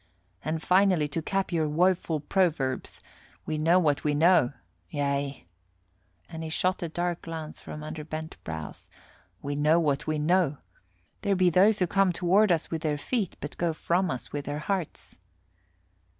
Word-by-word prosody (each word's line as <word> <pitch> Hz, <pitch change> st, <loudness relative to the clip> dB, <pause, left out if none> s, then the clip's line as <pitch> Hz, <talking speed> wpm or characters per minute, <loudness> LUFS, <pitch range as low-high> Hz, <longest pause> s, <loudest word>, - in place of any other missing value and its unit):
And 155 Hz, +2 st, -2 dB
finally, 185 Hz, -4 st, +3 dB
to 165 Hz, +3 st, -3 dB
cap 195 Hz, +3 st, -1 dB
our 160 Hz, -2 st, +1 dB
woeful 170 Hz, -1 st, +1 dB
proverbs, 150 Hz, -6 st, 0 dB, 0.4 s
we 155 Hz, -1 st, -2 dB
know 165 Hz, +4 st, +4 dB
what 150 Hz, -5 st, +2 dB
we 150 Hz, -1 st, +1 dB
know 165 Hz, -4 st, +4 dB, 0.4 s
yea," 140 Hz, -4 st, -2 dB, 0.8 s
and 160 Hz, -1 st, -7 dB
he 160 Hz, -, -4 dB
shot 185 Hz, +3 st, 0 dB
a 170 Hz, -, -3 dB
dark 175 Hz, +1 st, -2 dB
glance 160 Hz, -2 st, -7 dB
from 150 Hz, -, -8 dB
under 155 Hz, 0 st, -6 dB
bent 155 Hz, +1 st, -6 dB
brows, 80 Hz, -1 st, -7 dB, 0.5 s
"we 145 Hz, 0 st, -2 dB
know 150 Hz, +3 st, +4 dB
what 150 Hz, -3 st, 0 dB
we 155 Hz, 0 st, 0 dB
know; 155 Hz, -1 st, +2 dB, 0.6 s
there 200 Hz, -2 st, +1 dB
be 180 Hz, -1 st, +3 dB
those 200 Hz, +5 st, +5 dB
who 185 Hz, -, +2 dB
come 195 Hz, +1 st, +2 dB
toward 185 Hz, +4 st, +3 dB
us 165 Hz, -2 st, 0 dB
with 165 Hz, -1 st, -2 dB
their 150 Hz, -2 st, 0 dB
feet, 205 Hz, -, -2 dB
but -, -, -7 dB
go 170 Hz, -2 st, 0 dB
from 175 Hz, +3 st, 0 dB
us 130 Hz, -6 st, -5 dB
with 145 Hz, -1 st, -3 dB
their 145 Hz, +1 st, -3 dB
hearts." 180 Hz, +1 st, -4 dB
160 Hz, 165 wpm, -27 LUFS, 150-180 Hz, 0.8 s, those